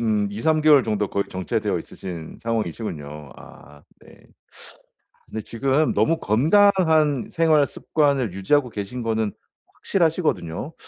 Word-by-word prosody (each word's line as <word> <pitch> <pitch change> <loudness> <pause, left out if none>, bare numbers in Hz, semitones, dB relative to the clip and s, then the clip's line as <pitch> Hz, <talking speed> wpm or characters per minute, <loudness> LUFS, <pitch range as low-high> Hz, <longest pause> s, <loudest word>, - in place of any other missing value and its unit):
음 105 -3 +1
2-3 155 +10 +1
개월 150 -3 +6
정도 105 -2 -1
거의 100 - -1
정체되어 95 -2 -2
있으신 85 -4 -9
상황이시군요. 80 - -4
아 75 0 -15 0.2
네. - - -19 1.0
근데 110 - -6
지금 135 +7 0
너무 165 0 +1
건강한 160 - +3
생활 160 -3 +3
습관을 140 - 0
유지하고 125 +8 +1
계신 110 +3 -6
거는 110 -2 -1 0.4
확실하시거든요. 160 - -1
115 Hz, 280 characters per minute, -23 LUFS, 100-155 Hz, 1.0 s, 개월